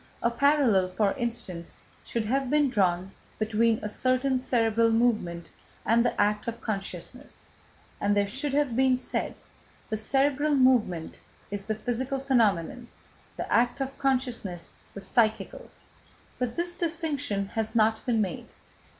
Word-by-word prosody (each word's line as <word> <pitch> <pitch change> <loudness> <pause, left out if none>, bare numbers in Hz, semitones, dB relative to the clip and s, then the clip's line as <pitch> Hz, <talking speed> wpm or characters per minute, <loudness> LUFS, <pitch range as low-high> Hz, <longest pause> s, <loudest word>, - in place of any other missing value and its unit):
A 235 - +3
parallel, 245 -7 +3
for 200 +1 +1
instance, 225 -9 -4 0.2
should 230 -2 -2
have 265 +3 0
been 295 -2 +3
drawn 185 -4 +1 0.3
between 220 +1 +2
a - - -1
certain 255 +4 +1
cerebral 230 -2 +2
movement 215 -8 0 0.3
and 230 +1 +4
the 245 - -1
act 210 +1 +1
of 230 0 -3
consciousness, 200 +5 -6 0.5
and 205 0 +1
there 200 - +3
should 270 +7 -2
have 285 -5 +1
been 260 0 +4
said: 255 - -3 0.5
"The 215 - -1
cerebral 280 +6 +1
motion 240 -11 +3 0.4
is 200 -1 -4
the 215 - -1
physical 245 +5 -2
phenomenon, 240 -3 +1 0.5
the - - -3
act 240 +3 +3
of 270 0 -3
consciousness 250 -10 -1 0.2
the 200 - -6
psychical." 220 +1 0 0.7
But 250 -2 -2
this 345 +1 -2
distinction 295 - -1
has 220 +1 -3
not 220 0 +3
been 235 -4 +1
made. 190 -5 -3
235 Hz, 140 wpm, -27 LUFS, 210-265 Hz, 0.7 s, and